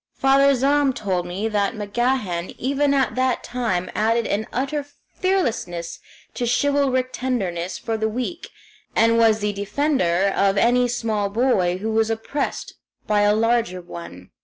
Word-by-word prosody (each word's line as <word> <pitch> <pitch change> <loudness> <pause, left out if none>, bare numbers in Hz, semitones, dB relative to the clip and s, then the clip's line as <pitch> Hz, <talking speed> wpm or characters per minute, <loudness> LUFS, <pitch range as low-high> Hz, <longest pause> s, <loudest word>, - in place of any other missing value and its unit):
Father 275 +1 +4
Zahm 275 +1 +2
told 185 -4 -2
me 190 +5 -3
that 210 +1 0
MacGahan 210 -4 -1
even 280 +2 +1
at 270 -5 +1
that 255 +1 0
time 225 -8 -2
added 225 +2 +1
an 210 +2 -1
utter 275 +3 -2 0.3
fearlessness 225 - -1 0.3
to 240 - -2
chivalric 260 0 +1
tenderness 190 -9 -2
for 225 -1 -3
the 220 0 0
weak, 255 +10 -4 0.5
and 230 +1 +4
was 220 -2 +4
the 205 0 0
defender 200 - +1
of 195 0 +2
any 245 +2 +3
small 220 -4 -1
boy 200 -6 +1
who 220 +4 -3
was 220 0 +2
oppressed 225 +6 -3 0.3
by 210 -1 +2
a 205 0 +4
larger 225 -5 +1
one. 170 - -10
225 Hz, 145 wpm, -22 LUFS, 200-260 Hz, 0.5 s, Father